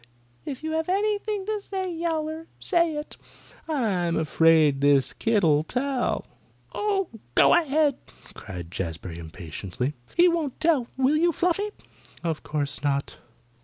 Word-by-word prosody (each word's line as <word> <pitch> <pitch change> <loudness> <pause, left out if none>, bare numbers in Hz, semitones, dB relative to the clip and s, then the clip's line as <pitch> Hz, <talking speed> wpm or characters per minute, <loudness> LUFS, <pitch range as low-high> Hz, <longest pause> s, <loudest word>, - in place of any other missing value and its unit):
If 270 +1 -6
you 315 - -2
have 320 +1 -1
anything 410 +1 0
to 425 0 -2
say, 380 -2 -4
Yowler, 320 -1 -2
say 340 -4 +2
it." 295 +1 -6 0.5
"I'm 200 - 0
afraid 160 -3 +4
this 140 -2 +4
kit'll 185 -10 +3
tell." 250 - -1 0.5
"Oh, 400 -3 0 0.3
go - - +6
ahead!" 300 -3 +3 0.4
cried 90 -4 -8
Jazbury 85 -1 -5
impatiently. 90 - -5 0.2
"He 350 +1 +7
won't 330 -6 -1
tell; 310 -7 +2
will 270 +3 +3
you, 340 +2 +3
Fluffy?" 360 +6 0 0.5
"Of 165 -3 -2
course 145 -2 -2
not." 140 -1 -1
275 Hz, 130 wpm, -26 LUFS, -, 0.5 s, He